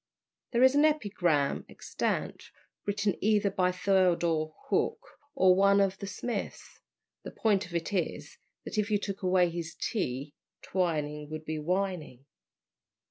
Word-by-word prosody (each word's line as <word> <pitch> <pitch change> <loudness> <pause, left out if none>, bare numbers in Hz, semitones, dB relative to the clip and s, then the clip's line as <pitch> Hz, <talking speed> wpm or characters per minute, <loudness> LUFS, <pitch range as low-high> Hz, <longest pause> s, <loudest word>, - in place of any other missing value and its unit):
There 240 +1 +3
is 260 0 +7
an 290 +1 +4
epigram 195 - +1
extant, - - -3 0.4
written 200 -1 +1
either 210 -1 +3
by 185 -1 +1
Theodore 175 -4 +2 0.2
Hook 460 - +1 0.4
or 185 -1 +6
one 200 +1 +4
of 195 -1 +1
the 200 - -5
Smiths; 240 +4 -5 0.4
the - - -7
point 205 -5 +1
of 175 - -9
it 170 +4 -2
is, 180 -4 -3 0.3
that 215 - -3
if 210 0 0
you 210 - +3
took 200 -1 -5
away 180 -2 +3
his 165 -1 -5
T, 145 - -2 0.3
Twining 150 -5 -2
would 155 0 -6
be 155 0 -3
Wining. 175 -6 -2
185 Hz, 140 wpm, -29 LUFS, 160-200 Hz, 0.4 s, is